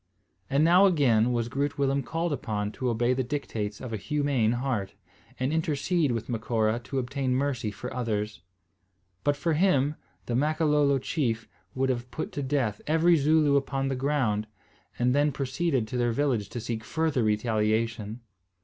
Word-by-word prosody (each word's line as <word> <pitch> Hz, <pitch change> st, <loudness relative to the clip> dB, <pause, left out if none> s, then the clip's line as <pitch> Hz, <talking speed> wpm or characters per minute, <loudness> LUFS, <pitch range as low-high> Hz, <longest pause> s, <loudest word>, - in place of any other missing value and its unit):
And 140 Hz, +2 st, +3 dB
now 180 Hz, +4 st, +6 dB
again 125 Hz, -, +3 dB
was 120 Hz, -1 st, 0 dB
Groot 140 Hz, +4 st, -2 dB
Willem 140 Hz, 0 st, +1 dB
called 165 Hz, +4 st, -2 dB
upon 105 Hz, -6 st, -2 dB
to 125 Hz, +3 st, -2 dB
obey 120 Hz, +2 st, +2 dB
the 130 Hz, -, 0 dB
dictates 110 Hz, -6 st, -4 dB
of 125 Hz, -3 st, -6 dB
a -, -, -1 dB
humane 140 Hz, -3 st, +1 dB
heart, 120 Hz, -6 st, -2 dB, 0.4 s
and 130 Hz, +4 st, 0 dB
intercede 160 Hz, -1 st, +1 dB
with 115 Hz, -2 st, -3 dB
Macora 115 Hz, -1 st, 0 dB
to 135 Hz, -, -4 dB
obtain 130 Hz, 0 st, -1 dB
mercy 130 Hz, -5 st, -1 dB
for 125 Hz, +4 st, -7 dB
others. 105 Hz, -4 st, -2 dB, 0.8 s
But 145 Hz, 0 st, +2 dB
for 160 Hz, +3 st, 0 dB
him, 150 Hz, -4 st, +3 dB, 0.3 s
the 120 Hz, -, -3 dB
Makololo 150 Hz, 0 st, +2 dB
chief 120 Hz, -5 st, -2 dB, 0.3 s
would 135 Hz, 0 st, +1 dB
have 125 Hz, -1 st, -2 dB
put 155 Hz, -, -5 dB
to 145 Hz, -, -4 dB
death 130 Hz, -6 st, -1 dB
every 165 Hz, +3 st, +4 dB
Zooloo 150 Hz, -1 st, +4 dB
upon 135 Hz, -1 st, -1 dB
the 135 Hz, -, -1 dB
ground, 125 Hz, -6 st, 0 dB, 0.5 s
and 125 Hz, +1 st, +2 dB
then 145 Hz, +1 st, +3 dB
proceeded 135 Hz, -2 st, -1 dB
to 125 Hz, -, -3 dB
their 120 Hz, -1 st, +2 dB
village 120 Hz, -6 st, 0 dB
to 120 Hz, -, -5 dB
seek 115 Hz, -1 st, -4 dB
further 160 Hz, +1 st, 0 dB
retaliation. 110 Hz, +1 st, 0 dB
130 Hz, 165 wpm, -27 LUFS, 115-145 Hz, 0.8 s, now